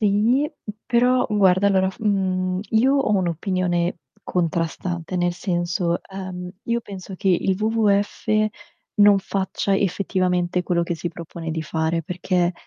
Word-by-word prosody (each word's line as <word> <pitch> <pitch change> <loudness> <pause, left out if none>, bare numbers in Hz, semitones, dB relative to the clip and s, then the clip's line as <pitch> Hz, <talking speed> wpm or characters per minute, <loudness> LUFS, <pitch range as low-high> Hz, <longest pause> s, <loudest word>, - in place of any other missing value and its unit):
Sì, 220 +8 +3 0.4
però 250 +1 +3
guarda 195 -2 +4
allora, 190 -1 +3
mhmm, 185 -3 0
io 245 +5 +4
ho 275 -5 +1
un'opinione 175 -1 0 0.2
contrastante, 170 +1 -2
nel 175 0 +1
senso, 175 -1 -1
ehm, 185 -2 -7
io 235 0 0
penso 195 -3 -9
che 195 - -1
il 185 +1 +2
WWF 215 -2 +1 0.7
non 205 -1 +7
faccia 195 0 -1
effettivamente 180 -2 0
quello 175 -1 +1
che 170 - -2
si 170 +1 -4
propone 165 -1 -7
di 160 0 -2
fare, 160 +1 -1
perché, 180 +1 0
185 Hz, 130 wpm, -22 LUFS, 175-200 Hz, 0.7 s, non